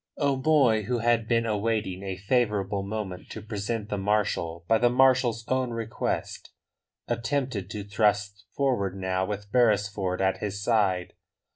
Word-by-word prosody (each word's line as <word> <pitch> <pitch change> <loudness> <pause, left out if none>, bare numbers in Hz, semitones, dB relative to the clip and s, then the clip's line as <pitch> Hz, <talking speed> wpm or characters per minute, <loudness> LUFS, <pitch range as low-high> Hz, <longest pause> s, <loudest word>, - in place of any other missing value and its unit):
O'Moy, 135 -4 +3
who 125 +3 0
had 115 -1 +1
been 115 0 +2
awaiting 105 -3 -1
a 95 -2 -4
favourable 105 -2 0
moment 100 -2 -5
to - - -7
present 105 0 -4
the 105 - -2
marshal 95 -5 -1
by 115 0 +4
the 120 +1 +4
marshal's 125 -3 +3
own 130 -1 0
request, 115 -1 -3 0.6
attempted 120 -4 -2
to 105 -1 -5
thrust 105 -1 0
forward 120 -9 0
now 95 0 0
with 100 0 -5
Beresford 100 -6 +2
at 95 0 +1
his 100 -1 -3
side. 100 -6 +1
105 Hz, 140 wpm, -27 LUFS, 100-120 Hz, 0.6 s, by